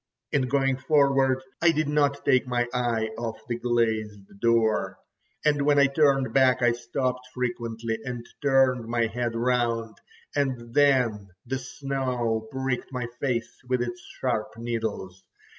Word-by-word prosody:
In 130 -2 +1
going 135 0 +1
forward 135 -2 +3 0.2
I 170 - +6
did 155 -1 0
not 145 -1 +1
take 130 0 +3
my 120 -1 0
eye 115 -3 0
off 115 -1 -3
the 120 -1 -3
glazed 110 -5 -1
door, 115 -1 +2 0.5
and 145 -1 +3
when 145 0 +3
I 140 - +7
turned 135 -1 +2
back 130 -2 +4
I 120 - +5
stopped 125 +2 -3
frequently 115 -2 -3
and 120 -1 -5 0.2
turned 135 -4 +3
my 115 0 +1
head 115 +1 -2
round, 115 -2 0 0.4
and 125 -5 -1
then 125 -8 +3 0.2
the 130 +2 -2
snow 125 -4 -2
pricked 130 0 -3
my 125 -2 -3
face 125 -4 -2
with 125 -1 +1
its 120 0 -5 0.2
sharp 120 -4 0
needles. 110 -5 -4
125 Hz, 140 wpm, -26 LUFS, 115-135 Hz, 0.5 s, I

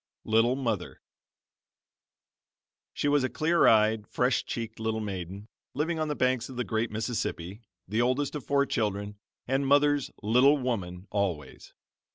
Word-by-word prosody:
"LITTLE 115 +3 +3
MOTHER" 115 -9 -3 1.9
She - - -2
was 145 -1 +3
a 130 - 0
clear 165 +2 +3
eyed, 110 -1 +4
fresh 125 +1 +1
cheeked 115 -2 -5
little 110 0 -1
maiden, 100 -1 -6 0.3
living 160 +3 -1
on 155 - 0
the 150 - -2
banks 125 -2 0
of 130 - -9
the 125 - -1
great 110 +2 -1
Mississippi, 105 -3 -3 0.3
the 110 +5 0
oldest 130 +3 0
of 150 -4 -5
four 140 +4 +2
children, 105 -3 -2 0.3
and 135 +2 0
mother's 145 0 +3
"little 125 +7 +5
woman" 95 -9 -3
always. 90 -9 -3
115 Hz, 145 wpm, -28 LUFS, 105-135 Hz, 1.9 s, little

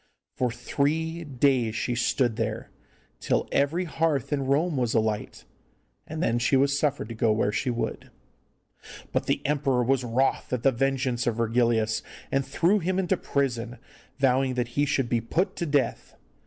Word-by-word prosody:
For 125 -2 0
three 160 +7 -1
days 130 -5 +1
she 125 - -1
stood 120 0 +1
there, - - -3 0.5
till - - 0
every 155 +6 +1
hearth 155 -5 0
in 135 -2 -1
Rome 155 +4 +2
was 120 -3 0
alight, 110 -2 -1 0.6
and 160 +2 -3
then 115 +1 +1
she 130 +3 +2
was 140 +1 +3
suffered 145 -6 0
to - - -5
go 115 0 +2
where 105 -1 +1
she 125 - -1
would. 120 -1 -3 1.0
But - - -1
the - - 0
emperor 135 -4 +1
was 130 +1 +1
wroth 125 +3 0
at 120 -2 -1
the 135 - +5
vengeance 130 -1 0
of 120 - +1
Virgilius, 115 -1 +1 0.3
and 135 - +2
threw 180 +9 +2
him 185 +1 -1
into 190 0 +1
prison, 125 -7 -2 0.4
vowing 130 -1 +2
that 125 -1 -1
he 145 +4 0
should 135 -3 +1
be 120 -1 0
put 180 - -1
to 170 - -2
death. 145 -2 -1
130 Hz, 170 wpm, -26 LUFS, 120-145 Hz, 1.0 s, the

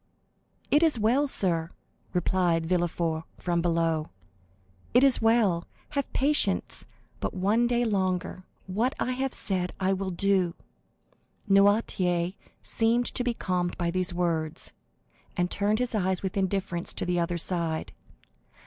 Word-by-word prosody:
"It 295 - +5
is 315 -8 +3
well, 250 +7 +2
sir," 170 -9 +1 0.4
replied 175 -2 +1
Villefort 170 -2 -1
from 175 -1 -1
below,—"it 95 - -2
is 275 -2 +5
well; 225 -7 +2 0.2
have 280 -2 -3
patience 290 +3 +1 0.3
but - - -3
one 210 +6 +2
day 240 0 +1
longer; 185 -3 -1 0.2
what 220 +8 -1
I 255 - 0
have 265 +1 -1
said 180 -2 -1
I 190 0 +2
will 190 0 -2
do." 185 -1 +1 0.9
Noirtier 195 -3 +2 0.3
seemed 230 +2 +2
to 250 - +3
be 245 -1 -1
calmed 180 -3 -2
by 170 -1 -1
these 185 0 0
words, 165 -3 -2 0.7
and 180 0 0
turned 205 +1 +1
his 250 0 -1
eyes 190 -3 0
with 190 - -3
indifference 190 -2 -1
to - - -2
the 180 0 0
other 170 0 -1
side. 165 -2 -1
185 Hz, 130 wpm, -27 LUFS, 170-220 Hz, 0.9 s, It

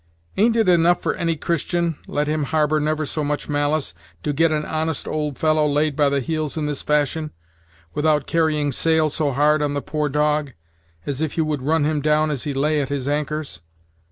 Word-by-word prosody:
Ain't 225 +3 +3
it 225 -3 +2
enough 175 0 +4
for - - +1
any 165 -1 -1
Christian, 170 +2 -1
let 145 +1 -1
him 155 -1 0
harbor 155 0 +1
never 155 +1 0
so 150 +1 -2
much 145 0 -2
malice, 145 - 0 0.3
to 145 - -1
get 165 +3 +3
an 150 -1 -1
honest 160 -1 -2
old 150 -3 -2
fellow 155 -1 +2
laid 150 0 +1
by 145 -1 +3
the 140 0 0
heels 155 +2 -2
in 155 - -1
this 145 -2 -2
fashion, 150 +1 0 0.6
without 150 -2 +1
carrying 155 -3 +1
sail 160 0 +2
so 150 -1 0
hard 150 +3 +3
on 145 -1 -1
the - - 0
poor 150 -1 -1
dog, 150 -1 0 0.5
as 140 0 -3
if 160 0 -2
you 160 - +2
would 150 -3 -2
run 155 +3 +1
him 150 0 0
down 155 +1 +2
as 140 -2 -4
he 145 - -2
lay 150 +2 +1
at 135 - -3
his 140 -2 -3
anchors? 150 - -2
150 Hz, 205 wpm, -22 LUFS, 145-155 Hz, 0.6 s, enough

